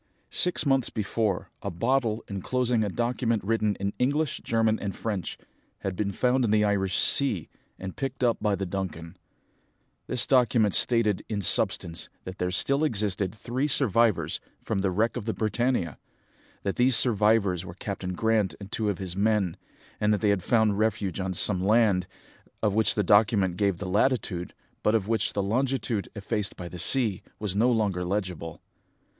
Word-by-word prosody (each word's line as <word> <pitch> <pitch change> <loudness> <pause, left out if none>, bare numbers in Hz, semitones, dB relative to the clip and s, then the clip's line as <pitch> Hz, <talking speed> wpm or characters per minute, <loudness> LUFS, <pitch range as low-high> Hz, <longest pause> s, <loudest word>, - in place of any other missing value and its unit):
Six 180 -3 +3
months 135 -3 +2
before, 105 -2 -2
a 100 - -3
bottle, 115 +4 0
enclosing 120 +4 -1
a 105 - -1
document 120 0 -1
written 105 0 0
in 100 +1 -3
English, 145 +3 0
German, 115 -1 +1
and 100 -1 -4
French, 105 -6 -4 0.4
had 95 -1 -3
been 100 +1 -1
found 125 +5 +1
in 115 - +1
the 105 0 +3
Irish 95 -3 +1
sea, 120 - +3 0.3
and 95 -1 -7
picked 135 -1 -4
up 120 -2 +2
by 105 -2 +1
the 95 +1 -3
Duncan. 85 -3 -5 0.9
This 125 - +1
document 120 -5 +3
stated 115 -5 +2
in 105 -2 -2
substance 85 -1 +1
that 95 +1 -8
there 90 - 0
still 140 +10 +1
existed 105 - 0
three 125 +6 -2
survivors 115 - +3 0.2
from - - -2
the 95 0 +1
wreck 105 +6 0
of 115 - -5
the 110 - -2
Britannia, 110 - -1 0.6
that 100 - -2
these 125 0 +4
survivors 105 -6 +2
were 85 -2 -9
Captain 95 -2 -5
Grant 105 -3 +1
and 100 0 -10
two 110 -2 -1
of 100 - -2
his 95 -2 -5
men, 100 -3 +1 0.4
and 105 0 +2
that 105 - +1
they 105 - +2
had 100 -2 +1
found 110 -1 +2
refuge 105 -4 -1
on 95 -1 -2
some 95 0 +3
land, 100 -3 +3 0.6
of 105 -2 +2
which 110 +1 +2
the 105 - +1
document 100 -2 +3
gave 100 -1 0
the 100 - -6
latitude, 95 -4 0 0.3
but 105 - +2
of 105 -3 0
which 115 -1 0
the 100 - -1
longitude, 115 -1 -1
effaced 105 -1 -3
by 90 - -7
the 90 0 -8
sea, 105 +2 +2 0.2
was 105 -3 -4
no 120 +5 +3
longer 100 -6 0
legible. 90 -4 -4
105 Hz, 175 wpm, -26 LUFS, 95-115 Hz, 0.9 s, these